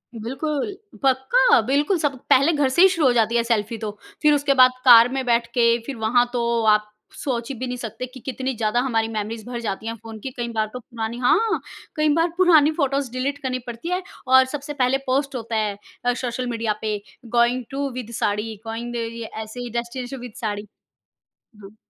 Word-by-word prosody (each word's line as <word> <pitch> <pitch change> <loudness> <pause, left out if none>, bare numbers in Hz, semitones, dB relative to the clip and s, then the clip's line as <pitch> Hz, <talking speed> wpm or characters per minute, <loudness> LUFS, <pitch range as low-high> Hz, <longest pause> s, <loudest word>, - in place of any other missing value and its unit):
बिल्कुल, 280 - -3 0.3
पक्का 270 - +4
बिल्कुल 290 +8 +2
सब 290 -2 +1 0.2
पहले 275 +5 +5
घर 290 -3 +2
से 300 +7 +3
ही 380 - +9
शुरू 335 -6 +2
हो 250 - +4
जाती 230 -1 +2
है 235 - +3
सेल्फी 230 -1 -1
तो, 215 -1 -4 0.3
फिर 300 0 +5
उसके 285 -1 +2
बाद 255 0 +8
कार 240 -1 +9
में 265 -1 -2
बैठ 235 -1 +2
के 235 -2 +4
फिर 275 - -5
वहाँ 240 +2 +4
तो 235 -1 0
आप 210 0 -3 0.3
सोच 240 -2 -3
भी 255 -1 -4
नहीं 250 0 -4
सकते 230 0 -5
कि 255 +1 -12
कितनी 260 +1 -3
ज़्यादा 220 +1 +1
हमारी 225 -3 +1
मेमोरीज़ 220 0 -4
भर 240 - -4
जाती 215 0 -4
है 230 - -3
फ़ोन 225 0 -10
की। 265 - -4
कई 240 -1 -2
बार 215 -1 +1
तो 250 - -5
पुरानी 230 -1 -5
हाँ, 420 - +2 0.4
कई 305 0 +2
बार 330 +2 +2
पुरानी 320 -5 +5
फोटोज़ 275 -3 0
डिलीट 265 +3 -2
करनी 255 -1 -1
पड़ती 240 +8 -6
है 360 +1 0 0.3
और 260 0 +8
सबसे 295 +1 -6
पहले 265 -1 +2
पोस्ट 275 +1 0
होता 230 -1 -4
है 210 -2 -1 0.3
अ, 245 - +3
सोशल 250 0 -3
मीडिया 225 -2 -1
पे 215 -1 -1 0.4
going 240 +2 +3
to 275 +1 -2
with 245 -2 -6
sari 210 +2 -1
going 230 +2 -4
दि 240 - -2
अ, - - -3
ये 230 0 -7 0.2
ऐसे 220 +3 -10
ही 245 0 -5
डेस्टिनेशन 245 +3 -4
विद 245 -2 -9
साड़ी, 210 -1 -3 1.0
हाँ। 200 +2 -13
245 Hz, 210 wpm, -22 LUFS, 230-275 Hz, 1.0 s, ही